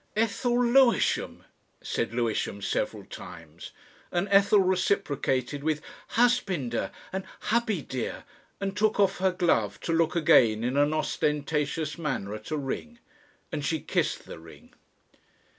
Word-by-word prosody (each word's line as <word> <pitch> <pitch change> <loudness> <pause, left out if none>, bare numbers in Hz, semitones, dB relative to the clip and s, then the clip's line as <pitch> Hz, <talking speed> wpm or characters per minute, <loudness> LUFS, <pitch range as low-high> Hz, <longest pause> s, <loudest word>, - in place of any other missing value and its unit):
"Ethel 240 +3 +1
Lewisham," 245 0 +3 0.4
said - - -2
Lewisham 115 -4 -1
several 100 - -2
times, 80 0 -10 0.4
and 175 +3 0
Ethel 200 +1 +6
reciprocated 150 -8 0
with 155 -1 0 0.3
"Husbinder" 195 - +1 0.2
and 190 0 -2 0.3
"Hubby 220 -8 +1
dear," 130 -3 -4 0.4
and 195 -1 -3
took 215 +1 +1
off 195 -1 +3
her 190 0 +3
glove 115 - +1
to 165 - -1
look 165 0 +2
again 115 -9 +4
in 125 +2 -1
an 145 +1 +3
ostentatious 150 0 -1
manner 135 -10 -3
at 110 0 -8
a 155 - -1
ring. 150 - -5 0.5
And 150 - -3
she 160 +2 0
kissed - - -1
the - - -9
ring. 80 0 -15
160 Hz, 130 wpm, -27 LUFS, 130-195 Hz, 0.5 s, Ethel